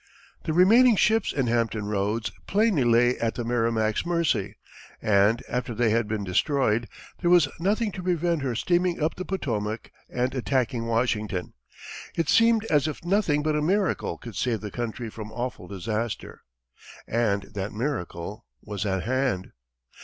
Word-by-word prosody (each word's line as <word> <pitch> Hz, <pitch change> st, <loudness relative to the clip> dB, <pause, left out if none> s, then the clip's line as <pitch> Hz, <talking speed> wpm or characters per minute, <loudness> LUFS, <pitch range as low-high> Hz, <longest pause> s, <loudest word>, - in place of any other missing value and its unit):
The 160 Hz, -, -1 dB
remaining 225 Hz, +8 st, +6 dB
ships 220 Hz, +1 st, +2 dB
in 135 Hz, -3 st, 0 dB
Hampton 115 Hz, -3 st, 0 dB
Roads 105 Hz, +2 st, -1 dB, 0.2 s
plainly 205 Hz, -, +3 dB
lay 120 Hz, +1 st, +3 dB
at 115 Hz, -1 st, -1 dB
the 120 Hz, -, -3 dB
Merrimac's 115 Hz, -2 st, 0 dB
mercy, 170 Hz, -2 st, 0 dB, 0.4 s
and 105 Hz, +4 st, +3 dB
after 125 Hz, -1 st, -3 dB
they 115 Hz, -1 st, +2 dB
had 115 Hz, -1 st, +1 dB
been 105 Hz, -1 st, -2 dB
destroyed, 115 Hz, +4 st, +1 dB, 0.3 s
there 175 Hz, -, +1 dB
was 175 Hz, -4 st, +6 dB
nothing 205 Hz, +5 st, +1 dB
to 185 Hz, -, -6 dB
prevent 175 Hz, -3 st, 0 dB
her 130 Hz, -3 st, -2 dB
steaming 175 Hz, +6 st, +1 dB
up 155 Hz, +1 st, +1 dB
the 185 Hz, -, -6 dB
Potomac 115 Hz, -, -3 dB, 0.2 s
and 125 Hz, +1 st, -1 dB
attacking 125 Hz, -2 st, -1 dB
Washington. 110 Hz, -6 st, -1 dB, 0.6 s
It 165 Hz, -3 st, 0 dB
seemed 230 Hz, -1 st, +4 dB
as 150 Hz, -8 st, +2 dB
if 155 Hz, +2 st, -6 dB
nothing 175 Hz, -6 st, +2 dB
but 155 Hz, 0 st, +1 dB
a 150 Hz, -, +1 dB
miracle 190 Hz, +5 st, 0 dB
could 115 Hz, -4 st, -10 dB
save 115 Hz, -4 st, -1 dB
the 105 Hz, -1 st, -6 dB
country 120 Hz, -1 st, -4 dB
from 110 Hz, -1 st, -8 dB
awful 120 Hz, -5 st, -5 dB
disaster. 105 Hz, +4 st, -4 dB, 0.7 s
And 110 Hz, -4 st, +1 dB
that 100 Hz, 0 st, -3 dB
miracle 105 Hz, -, -4 dB, 0.2 s
was 105 Hz, 0 st, -4 dB
at 95 Hz, -1 st, -1 dB
hand. 130 Hz, -7 st, -1 dB
120 Hz, 155 wpm, -26 LUFS, 110-165 Hz, 0.7 s, remaining